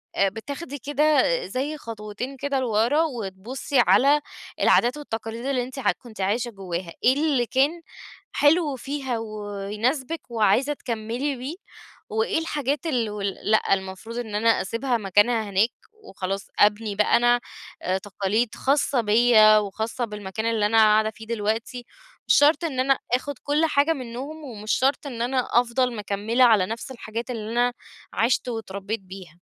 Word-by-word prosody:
آآ، 195 0 +3
بتاخدي 280 - -7
كده 295 +3 +2 0.2
زي 285 +4 -3
خطوتين 230 +3 -7
كده 280 0 -1
لورا 240 +5 +2
وتبُصي 245 - -3
على 255 +9 +5 0.4
العادات 245 +5 +4
والتقاليد 230 -3 -6
اللي 260 -3 0
أنتِ 260 +2 -8
عت - - +1
كُنتِ 220 -5 -10
عايشة 230 +5 0
جوّاها، 180 -3 -5
إيه 255 - +6
اللي 285 -4 +1
كان 280 +8 +1 0.5
حلو 295 -1 +3
فيها 265 -2 -3
ويناسبِك 215 +8 -3
وعايزة 230 +6 +2
تكملي 240 +3 -3
بيه، 265 +7 -6 0.5
وإيه 440 -6 0
الحاجات 295 -1 -2
ال 240 -7 0
و 210 -1 -6
لأ 200 +2 +1
المفروض 190 +5 -4
إن 220 -4 -4
أنا 225 +2 +2
أسيبها 235 +5 -1
مكانها 210 +2 +2
هناك، 200 +4 +3 0.3
وخلاص 195 - -5
أبني 210 0 +3
بقى 210 +2 +4
أنا 240 0 +3 0.4
آآ، 185 +1 0
تقاليد 205 +4 -1
خاصة 275 -2 +1
بيا 215 0 +6
وخاصة 220 +4 -2
بالمكان 210 0 -5
اللي 225 -2 +1
أنا 225 +2 +2
قاعدة 215 0 +5
فيه 220 +1 -13
دلوقتي، 230 +2 -2 0.4
مش - - +5
شرط 300 +4 +4
إن 265 -5 -3
أنا 270 +1 +3
آخد 280 +3 0
كل 295 +3 +2
حاجة 305 +1 +2
منّهم 270 +4 -7
ومش 215 -5 -5
شرط 275 +2 +1
إن 235 -3 -5
أنا 255 +1 0
أفضل 245 0 -1
مكمّلة 210 +4 0
على 215 -6 +5
نفس 230 +5 -6
الحاجات 230 0 -6
اللي 220 -2 -5
أنا 245 +1 +2 0.4
عِشت 235 +3 +1
واتربيت 215 -1 -4
بيها. 185 -3 -11
235 Hz, 150 wpm, -24 LUFS, 210-270 Hz, 0.5 s, إيه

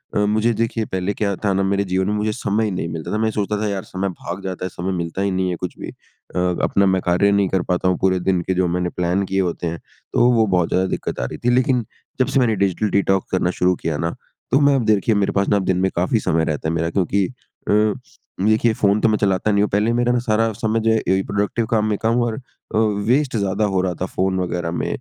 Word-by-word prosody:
अ, - - +2
मुझे 110 +3 +2
देखिए 115 0 -1
पहले 95 +1 -2
क्या 100 -2 -1
था 100 - +2
ना 95 +1 +1
मेरे 100 +1 +1
जीवन 95 0 -1
में 105 - 0
मुझे 105 +1 0
समय 110 -2 0
ही 105 - -1
नहीं 90 -3 -3
मिलता 80 -1 -5
था, 105 - +1
मैं 110 0 +1
सोचता 105 0 -1
था 105 - 0
यार 100 -2 -3
समय 95 +1 -3
भाग 90 +1 -7
जाता 95 -1 -4
है, - - -3
समय 90 +2 -4
मिलता 85 +2 -3
ही 100 0 0
नहीं 95 0 0
है 90 - -1
कुछ 90 +1 -6
भी - - -6
अ, - - -10 0.2
अपना 100 - +3
मैं 95 -1 +2
कार्य 90 +3 +3
नहीं 100 -1 +3
कर 95 -2 +1
पाता 90 +1 0
हूँ 90 - +2
पूरे 95 -1 +2
दिन 90 0 +1
के 95 - -1
जो 90 -1 +2
मैंने 90 +1 -1
प्लान 90 +3 0
किए 95 +1 -1
होते 85 -1 -2
हैं। 85 0 -4 0.3
तो 120 - +4
वो 115 -2 +4
बहुत 90 -3 +1
ज़्यादा 95 +1 +1
दिक्कत - - -5
आ - - -1
रही - - -6
थी 120 - +4
लेकिन 125 -2 +2 0.3
जब 130 - +3
से 135 - +1
मैंने 115 -4 +2
डिजिटल 100 +2 0
डिटॉक्स 95 -1 +1
करना 90 -1 +1
शुरू 90 0 +3
किया 80 -3 -3
ना, 85 +2 -2 0.4
तो 135 - +4
मैं 140 -1 +4
अब 125 -4 0
देखिए 110 +1 +2
मेरे 100 -1 +1
पास 100 0 0
ना 100 - +3
दिन 95 -1 0
में 95 +1 +2
काफ़ी 90 +6 +1
समय 80 -5 +1
रहता 75 0 -2
है 80 - -1
मेरा 80 0 0
क्योंकि 95 +2 +1
अ, 105 -4 -1 0.5
देखिए 110 +2 +3
फ़ोन 100 0 +2
तो 115 - +4
मैं 105 - +2
चलाता 100 +1 +1
नहीं 100 0 +3
हूँ 105 - 0
पहले 105 +3 +1
मेरा 120 0 +2
ना 125 - +2
सारा 115 -1 +1
समय 110 0 -1
जो 115 - +2
है 110 - +3
ए 95 +1 +3
प्रोडक्टिव 105 +3 -1
काम 110 -2 +2
में 105 - 0
कम 115 +2 +2
और 115 -2 -1 0.4
अ, - - +3
वेस्ट 110 +6 +1
ज़्यादा 100 +1 0
हो 95 - +2
रहा 90 -1 -1
था 95 - +1
फ़ोन 95 0 -1
वग़ैरह 90 -2 -2
में। 85 - -2
100 Hz, 265 wpm, -20 LUFS, 90-110 Hz, 0.5 s, तो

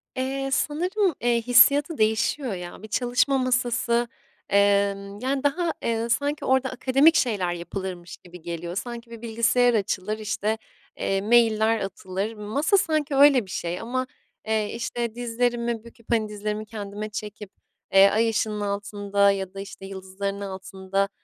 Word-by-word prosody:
Eee, 270 +1 -2
sanırım, 360 +6 0
eee, 235 -1 +2
hissiyatı 280 +6 +5
değişiyor 220 +3 +1
ya. 180 +2 -8
Bir - - -7
çalışma 250 +4 +1
masası, 240 -2 +1 0.4
emm, 200 0 +2
yani, 265 +3 -1
daha, 330 +4 +1
eee, 230 0 -1
sanki 285 +5 0
orada 260 0 +2
akademik 270 +5 +4
şeyler 195 -8 +1
yapılırmış 175 0 -6
gibi 180 -1 -14
geliyor. 170 +1 -5
Sanki 235 +2 -5
bir 230 -1 -9
bilgisayar 235 +1 +2
açılır, 210 0 -1
işte, 215 0 -2 0.4
eee, 195 0 0
mailler 225 0 +3
atılır. 195 +2 -4
Masa 225 - +1
sanki 305 -5 0
öyle 275 -5 +6
bir 185 - -11
şey 175 -1 -3
ama, 255 +3 -2 0.4
eee, 215 -1 0
işte, 235 -1 -3
dizlerimi 235 -1 -1
büküp, 230 -1 -16
hani, 220 -2 +1
dizlerimi 210 +1 -4
kendime 210 -1 -6
çekip, 210 -1 -7 0.4
eee, 195 +1 +8
ay 225 +2 +2
ışığının 210 -1 -1
altında 200 0 +1
ya 190 -1 -4
da, 195 - -8
işte, 195 -1 -9
yıldızların 195 +1 -5
altında, 195 0 -3
220 Hz, 145 wpm, -25 LUFS, 200-245 Hz, 0.4 s, eee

